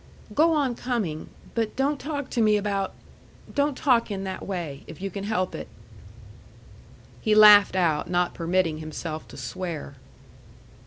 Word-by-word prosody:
"Go 325 Hz, +3 st, +4 dB
on 285 Hz, -5 st, +1 dB
coming. 225 Hz, -11 st, -3 dB, 0.2 s
But 225 Hz, -2 st, -1 dB
don't 280 Hz, +2 st, 0 dB
talk 285 Hz, -1 st, -4 dB
to 240 Hz, -, +1 dB
me 215 Hz, -1 st, +4 dB
about 200 Hz, -1 st, -2 dB, 0.6 s
don't 285 Hz, -1 st, +1 dB
talk 245 Hz, -6 st, +3 dB
in 195 Hz, -2 st, -4 dB
that 190 Hz, -1 st, -5 dB
way 165 Hz, -8 st, -5 dB
if 160 Hz, -, -10 dB
you 195 Hz, +1 st, -4 dB
can 200 Hz, +2 st, -5 dB
help 185 Hz, -4 st, -1 dB
it." -, -, -6 dB, 1.5 s
He 215 Hz, -2 st, +2 dB
laughed 210 Hz, -2 st, +8 dB
out, 165 Hz, -5 st, +1 dB
not 180 Hz, 0 st, +1 dB
permitting 170 Hz, -2 st, 0 dB
himself 155 Hz, 0 st, -6 dB
to -, -, -12 dB
swear. 170 Hz, -, -5 dB
195 Hz, 150 wpm, -25 LUFS, 175-240 Hz, 1.5 s, laughed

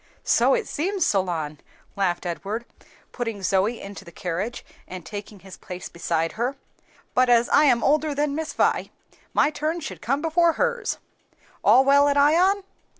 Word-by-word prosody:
"So -, -, +3 dB
it 480 Hz, -, -2 dB
seems, 375 Hz, +5 st, -1 dB
Solon," 165 Hz, -6 st, -1 dB, 0.4 s
laughed 190 Hz, -2 st, -1 dB
Edward, 200 Hz, +7 st, -4 dB, 0.5 s
putting 225 Hz, -5 st, -4 dB
Zoe 195 Hz, +6 st, +1 dB
into 200 Hz, 0 st, -9 dB
the 170 Hz, -, -13 dB
carriage 180 Hz, +8 st, -4 dB, 0.2 s
and 180 Hz, -3 st, -8 dB
taking 205 Hz, -1 st, -8 dB
his 190 Hz, -1 st, -12 dB
place 180 Hz, 0 st, -8 dB
beside 165 Hz, -1 st, -1 dB
her, 245 Hz, +5 st, -2 dB, 0.6 s
"but 255 Hz, 0 st, +3 dB
as 240 Hz, 0 st, +5 dB
I 300 Hz, -, +5 dB
am 240 Hz, -5 st, +3 dB
older 300 Hz, +1 st, +2 dB
than 290 Hz, 0 st, 0 dB
Miss 315 Hz, +1 st, -3 dB
Vi, -, -, +1 dB, 0.5 s
my 300 Hz, -, +4 dB
turn 310 Hz, +3 st, -2 dB
should 315 Hz, -, -7 dB
come 265 Hz, +7 st, 0 dB
before 335 Hz, +1 st, +3 dB
hers. 485 Hz, +4 st, -1 dB, 0.7 s
All 265 Hz, -, +6 dB
well 280 Hz, +1 st, +5 dB
at 285 Hz, 0 st, +2 dB
Ion?" 355 Hz, +8 st, +4 dB
245 Hz, 160 wpm, -24 LUFS, 190-300 Hz, 0.7 s, All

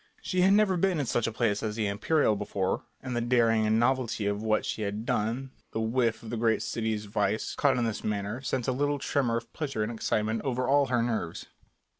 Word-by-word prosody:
She 185 Hz, -1 st, 0 dB
had 190 Hz, +2 st, +5 dB
never 205 Hz, -3 st, +4 dB
been 180 Hz, -2 st, +1 dB
in 145 Hz, -, 0 dB
such 120 Hz, -1 st, 0 dB
a -, -, -1 dB
place 110 Hz, -3 st, 0 dB
as 105 Hz, -1 st, -2 dB
the 110 Hz, -2 st, -1 dB
Imperial 110 Hz, +4 st, +2 dB
before, 100 Hz, -2 st, -2 dB, 0.2 s
and 130 Hz, -2 st, -4 dB
the 120 Hz, -, 0 dB
daring 115 Hz, -2 st, +3 dB
and 110 Hz, +1 st, +3 dB
novelty 120 Hz, -3 st, +1 dB
of 100 Hz, 0 st, -1 dB
what 110 Hz, -1 st, +1 dB
she -, -, -3 dB
had 105 Hz, +2 st, -3 dB
done, 120 Hz, +6 st, -1 dB, 0.2 s
the -, -, -1 dB
whiff 115 Hz, 0 st, 0 dB
of 110 Hz, -, -7 dB
the 120 Hz, -, -2 dB
great 110 Hz, -1 st, +2 dB
city's 110 Hz, -2 st, -2 dB
vice 105 Hz, +1 st, -1 dB
caught 140 Hz, -3 st, +2 dB
in 120 Hz, -, +1 dB
this 110 Hz, -2 st, -3 dB
manner, 105 Hz, +3 st, -2 dB
sent 130 Hz, -2 st, -2 dB
a -, -, +3 dB
little 145 Hz, +3 st, 0 dB
tremor 130 Hz, -4 st, 0 dB
of 115 Hz, 0 st, -8 dB
pleasure 135 Hz, -8 st, -2 dB
and 105 Hz, -, -2 dB
excitement 110 Hz, -1 st, -1 dB
over 130 Hz, -2 st, -1 dB
all 140 Hz, +1 st, +4 dB
her 120 Hz, -2 st, +1 dB
nerves. 110 Hz, -8 st, -3 dB
115 Hz, 225 wpm, -28 LUFS, 110-130 Hz, 0.2 s, had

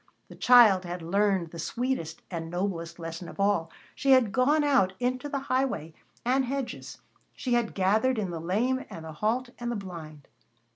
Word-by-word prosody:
The -, -, -11 dB
child 230 Hz, -7 st, +6 dB
had 175 Hz, -1 st, -6 dB
learned 190 Hz, -1 st, +1 dB
the 170 Hz, -, -8 dB
sweetest 230 Hz, -5 st, -3 dB
and 165 Hz, -2 st, -4 dB
noblest 170 Hz, -2 st, -3 dB
lesson 165 Hz, +1 st, -7 dB
of -, -, -12 dB
all. 195 Hz, -5 st, +2 dB, 0.2 s
She 275 Hz, -1 st, +3 dB
had 250 Hz, -6 st, +4 dB
gone 290 Hz, +6 st, +3 dB
out 260 Hz, -10 st, +3 dB
into 255 Hz, +3 st, -1 dB
the 280 Hz, -, -2 dB
highway 255 Hz, -, -1 dB, 0.3 s
and 260 Hz, +2 st, +3 dB
hedges, 270 Hz, 0 st, -4 dB, 0.4 s
she 250 Hz, -, -2 dB
had 240 Hz, -2 st, 0 dB
gathered 215 Hz, +7 st, +2 dB
in 195 Hz, -4 st, -2 dB
the 165 Hz, -2 st, -5 dB
lame 235 Hz, +10 st, 0 dB
and 160 Hz, -, -8 dB
the 160 Hz, -, -7 dB
halt 235 Hz, +9 st, -1 dB
and 240 Hz, 0 st, -3 dB
the -, -, -2 dB
blind. 165 Hz, -7 st, -8 dB
205 Hz, 180 wpm, -28 LUFS, 170-255 Hz, 0.4 s, child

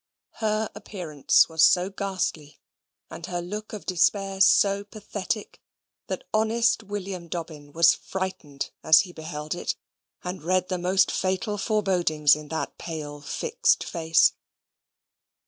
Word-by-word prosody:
Her 215 Hz, -1 st, -1 dB
appearance 160 Hz, -8 st, +1 dB
was 160 Hz, -1 st, -1 dB
so 180 Hz, +4 st, +5 dB
ghastly, 185 Hz, -7 st, -3 dB, 0.5 s
and -, -, -9 dB
her 175 Hz, -1 st, -3 dB
look 210 Hz, +5 st, -6 dB
of 210 Hz, -7 st, -7 dB
despair 195 Hz, +2 st, +1 dB
so 200 Hz, 0 st, +5 dB
pathetic, 205 Hz, 0 st, -5 dB, 0.5 s
that -, -, -4 dB
honest 225 Hz, +2 st, +2 dB
William 195 Hz, -4 st, -6 dB
Dobbin 155 Hz, -4 st, -7 dB
was 165 Hz, +2 st, +5 dB
frightened 185 Hz, -7 st, -5 dB
as 160 Hz, 0 st, +7 dB
he 180 Hz, -3 st, -9 dB
beheld 155 Hz, -1 st, -5 dB
it; 175 Hz, -, -3 dB, 0.5 s
and 180 Hz, 0 st, -5 dB
read 185 Hz, +2 st, 0 dB
the 185 Hz, -1 st, -1 dB
most 185 Hz, +1 st, +2 dB
fatal 190 Hz, +3 st, -1 dB
forebodings 180 Hz, -9 st, +2 dB
in 150 Hz, 0 st, -9 dB
that 160 Hz, -2 st, -4 dB
pale 150 Hz, -3 st, -6 dB
fixed 475 Hz, -, +1 dB
face. 165 Hz, -1 st, +3 dB
185 Hz, 130 wpm, -25 LUFS, 160-200 Hz, 0.5 s, as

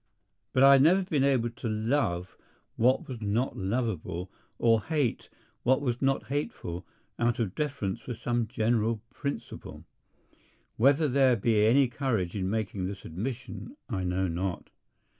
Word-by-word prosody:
But 130 Hz, -, +3 dB
I 140 Hz, 0 st, +9 dB
have 135 Hz, -, +6 dB
never 180 Hz, +6 st, +5 dB
been 155 Hz, -7 st, 0 dB
able 125 Hz, -4 st, +2 dB
to 115 Hz, 0 st, -5 dB
love 110 Hz, -5 st, 0 dB, 0.4 s
what 125 Hz, +3 st, +2 dB
was 125 Hz, -4 st, -7 dB
not 110 Hz, +5 st, 0 dB
lovable 95 Hz, -4 st, -2 dB, 0.3 s
or 115 Hz, -1 st, +4 dB
hate 145 Hz, -3 st, -1 dB, 0.3 s
what 130 Hz, +2 st, +3 dB
was 125 Hz, -4 st, -2 dB
not 135 Hz, 0 st, +1 dB
hateful 125 Hz, -, -4 dB, 0.3 s
out 120 Hz, 0 st, +2 dB
of 110 Hz, -6 st, -1 dB
deference 140 Hz, -11 st, -2 dB
for 120 Hz, -, -5 dB
some 120 Hz, 0 st, -1 dB
general 110 Hz, -1 st, 0 dB
principle. 140 Hz, +2 st, -6 dB, 0.9 s
Whether 140 Hz, +6 st, +4 dB
there 130 Hz, -2 st, +4 dB
be 110 Hz, -1 st, +3 dB
any 135 Hz, +4 st, +5 dB
courage 120 Hz, -8 st, -1 dB
in 95 Hz, -2 st, -1 dB
making 100 Hz, -3 st, -2 dB
this 100 Hz, 0 st, -7 dB
admission 125 Hz, -, -6 dB
I 95 Hz, -6 st, -2 dB
know 90 Hz, +1 st, 0 dB
not. 90 Hz, +2 st, -3 dB
115 Hz, 145 wpm, -29 LUFS, 100-135 Hz, 0.9 s, I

